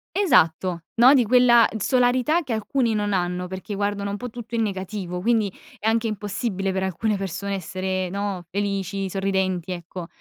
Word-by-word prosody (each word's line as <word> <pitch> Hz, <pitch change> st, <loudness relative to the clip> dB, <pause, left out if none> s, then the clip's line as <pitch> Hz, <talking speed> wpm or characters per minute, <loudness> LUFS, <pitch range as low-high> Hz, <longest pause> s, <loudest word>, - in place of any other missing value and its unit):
Esatto. 180 Hz, -, +3 dB
No, 245 Hz, +4 st, +7 dB
di 255 Hz, -4 st, +4 dB
quella 240 Hz, 0 st, +6 dB
t 220 Hz, -, -5 dB
solarità 255 Hz, -, +2 dB
che 255 Hz, -5 st, -3 dB
alcuni 225 Hz, +2 st, 0 dB
non 205 Hz, -1 st, 0 dB
hanno 180 Hz, 0 st, -1 dB
perché 190 Hz, +3 st, -6 dB
guardano 200 Hz, 0 st, -1 dB
un 200 Hz, -, -3 dB
po' 245 Hz, +2 st, -6 dB
tutto 235 Hz, 0 st, -7 dB
in 225 Hz, -, +2 dB
negativo, 190 Hz, -3 st, -4 dB
quindi 220 Hz, -3 st, +1 dB, 0.2 s
è 220 Hz, -, -3 dB
anche 225 Hz, 0 st, +2 dB
impossibile 205 Hz, -2 st, -2 dB
per 190 Hz, 0 st, -1 dB
alcune 200 Hz, +3 st, -1 dB
persone 195 Hz, +1 st, -4 dB
essere, 185 Hz, 0 st, -3 dB
no, 200 Hz, -2 st, -3 dB
felici, 195 Hz, 0 st, -2 dB
sorridenti, 190 Hz, -2 st, -1 dB
ecco. 175 Hz, 0 st, -7 dB
200 Hz, 170 wpm, -23 LUFS, 185-225 Hz, 0.2 s, No